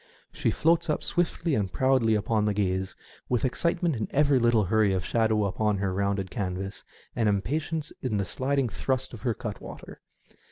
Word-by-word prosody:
She - - 0
floats 165 +1 +2
up 150 - 0
swiftly 170 -1 0
and 100 -7 0
proudly 130 -1 +3
upon 105 0 +1
the 105 -1 0
gaze, 95 -2 -1 0.3
with 125 +1 +1
excitement 170 +4 0
in 110 -2 -2
every 140 -2 +3
little 120 -2 +3
hurry 105 +1 +2
of 90 -1 -1
shadow 110 -2 +2
upon 105 +1 0
her 95 -1 -1
rounded 100 -1 -1
canvas, 95 0 -4 0.3
and 115 -3 +2
im 100 -1 +1
patience 155 +2 -2
in 115 -5 -1
the 100 - 0
sliding 135 +3 0
thrust 130 +4 -2
of 110 - -9
her 115 -1 0
cutwater. 110 -4 -8
110 Hz, 175 wpm, -27 LUFS, 100-135 Hz, 0.3 s, proudly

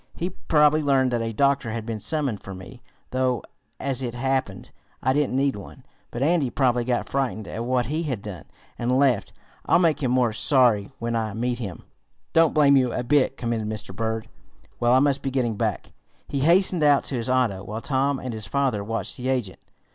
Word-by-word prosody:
He 175 +2 -3
probably 155 -3 +3
learned 135 -3 +2
that 120 -1 0
a 115 0 -2
doctor 140 +1 +1
had 110 0 -4
been 115 -2 -4
summoned 140 -6 -2
for 95 - -8
me, 105 +7 -11 0.3
though, 130 -3 0 0.4
as 135 -2 -2
it 120 -2 -4
happened, 130 -6 -2 0.3
I 130 - +3
didn't 145 -2 0
need 135 0 +1
one. 100 - -11 0.2
But 120 - -3
Andy 155 -3 +2
probably 125 -2 +1
got 120 0 -1
frightened 110 -7 -2
at 115 +6 -4
what 125 -1 +1
he 155 +7 -2
had 130 -11 -3
done, 95 -7 -8 0.3
and 125 +2 +1
left. 130 -6 +2 0.4
I'll - - +5
make 165 -3 +2
him 130 - 0
more 125 -3 +2
sorry, 115 -3 +3
when 115 0 -3
I 110 -2 -2
meet 120 +1 -1
him." 100 -7 -6 0.5
"Don't 165 -1 +4
blame 145 -2 +5
you 130 -3 +3
a - - -2
bit," 135 +1 +2
commented 115 -3 -2
Mr. 105 -3 -4
Berg. 110 +1 -2 0.5
"Well, 120 0 +3
I - - +6
must 140 0 +2
be 135 - -2
getting 125 -4 -1
back." - - -2 0.4
He 140 - -2
hastened 175 +4 +4
out 145 -2 +4
to 135 - -4
his 120 0 -3
auto, 120 -7 +1
while 110 +3 -6
Tom 135 +1 0
and 130 -2 -5
his 110 -2 -6
father 135 -7 0
watched 115 +2 -3
the 125 +1 -3
agent. 125 -8 -2
125 Hz, 205 wpm, -24 LUFS, 115-140 Hz, 0.5 s, I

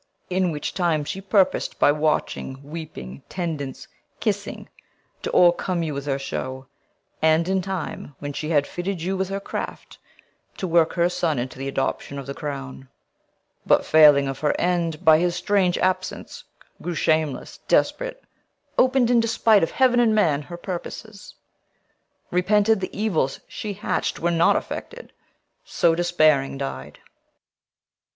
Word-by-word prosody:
In 185 -1 +1
which 150 -2 -4
time 170 -5 +1
she 190 +6 -5
purpos'd, 195 -1 +1
By - - +5
watching, 150 -3 -1
weeping, 140 - -8
tendance, 155 -7 -4 0.3
kissing, - - -3 0.5
to - - -3
O'ercome 175 0 +3
you 155 -2 -3
with 140 +1 -5
her 135 -1 0
show; 130 -1 -5 0.6
and 160 +2 +3
in 190 0 +1
time, 180 -6 -5
When 145 0 -6
she 155 +2 -4
had 145 -3 +3
fitted 175 0 -4
you 190 +2 -1
with 190 0 -2
her 195 0 -2
craft, 200 - -6 0.6
to - - -3
work 165 -1 +3
Her 170 -1 +2
son 170 -4 -1
into 125 +1 -4
th' 135 - -4
adoption 135 +1 -2
of 140 - -6
the 140 - -5
crown; 135 -3 -6 0.7
But - - +3
failing 150 -3 +6
of 135 -1 -4
her 150 - 0
end 170 -3 -1
by 160 -1 +7
his 175 0 +1
strange 190 -3 +1
absence, 185 0 -2 0.4
Grew 175 -1 -3
shameless 155 -3 0
desperate, - - +1 0.6
open'd, 255 -1 +4
in 240 - +5
despite 225 -2 +3
Of 165 - +1
heaven 255 -2 +3
and 225 -2 +4
men, 155 -9 +2
her 175 +4 -9
purposes, 200 +4 -7 1.0
repented 210 +4 +3
The 185 - -3
evils 175 -11 0
she 210 -2 -5
hatch'd 200 - -2
were 170 +1 0
not 170 0 +4
effected; 485 +1 -6 0.5
so, 170 - +2
Despairing, 155 -6 +2
died. 75 - -6
170 Hz, 145 wpm, -23 LUFS, 145-190 Hz, 1.0 s, by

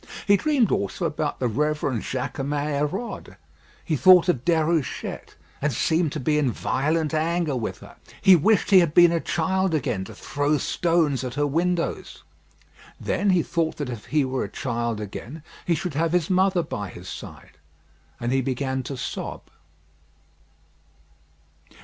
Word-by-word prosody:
He 205 - +5
dreamed 275 0 +2
also 195 -2 -1
about 150 -2 -2
the 125 - +1
Reverend 145 -1 -1
Jaquemin 135 +3 -3 0.3
Hérode. 215 +8 -6 0.5
He 160 - 0
thought 180 +3 +7
of 130 -8 +1
Déruchette, 160 -2 -1 0.3
and 150 +1 +1
seemed 160 +6 +1
to 155 - -3
be 150 +3 +1
in 135 -4 +1
violent 155 +6 -1
anger 160 -1 0
with 115 -3 -4
her. - - -13 0.2
He 190 -2 +7
wished 210 +6 +2
he 190 - +9
had 170 -4 +1
been 175 -1 +7
a 170 - +1
child 190 +2 0
again 110 -10 -1
to - - -11
throw 145 +1 0
stones 160 -2 +1
at 125 0 -5
her 145 0 +1
windows. 170 +4 -2 0.8
Then 205 - 0
he 180 -3 +3
thought 165 -1 -1
that 145 -4 -4
if 115 -3 -8
he 150 -2 +1
were 130 0 -2
a - - -5
child 120 -3 -3
again 115 +9 -7 0.2
he 170 - +3
should 175 0 -4
have 165 +3 0
his 180 -1 +1
mother 185 -1 +3
by 105 - -5
his 90 +1 -11
side, 75 - -10 0.6
and 120 +1 -2
he 135 0 +2
began 130 0 -2
to 135 +1 -6
sob. 125 - -6
155 Hz, 160 wpm, -24 LUFS, 130-175 Hz, 0.8 s, he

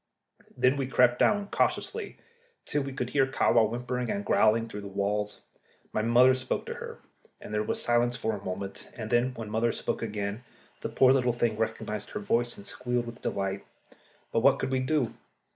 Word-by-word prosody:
Then 130 +2 +3
we 135 -2 -1
crept 125 -2 +4
down 205 -1 +3
cautiously 450 -3 -1 0.5
till 145 - 0
we 135 0 -4
could 125 -2 -4
hear 135 -2 +3
Kahwa 115 -4 +3
whimpering 125 +1 -3
and 205 0 -2
growling 115 +1 +3
through 105 -2 -7
the 100 - -7
walls. 105 +1 -2 0.5
My - - +1
mother 120 +3 +6
spoke 130 0 -2
to - - -4
her, - - -8 0.4
and 105 - -9
there 105 - +1
was 105 - -2
silence 120 0 +2
for 110 -3 -1
a 100 - -9
moment, 95 +1 -6
and 110 -2 -5
then, 125 +2 +2
when 110 -2 -6
mother 115 +2 +2
spoke - - -3
again, 105 0 -3 0.4
the - - -3
poor 130 0 +5
little 125 -3 +2
thing 120 -2 0
recognised 110 -1 -3
her - - -4
voice 120 - 0
and 100 - -11
squealed 125 -1 -2
with 120 0 -9
delight. 100 0 -2 0.7
But 115 - +2
what 135 +3 +5
could 130 -1 -2
we 130 - +2
do? 130 -2 0
120 Hz, 195 wpm, -28 LUFS, 110-130 Hz, 0.7 s, mother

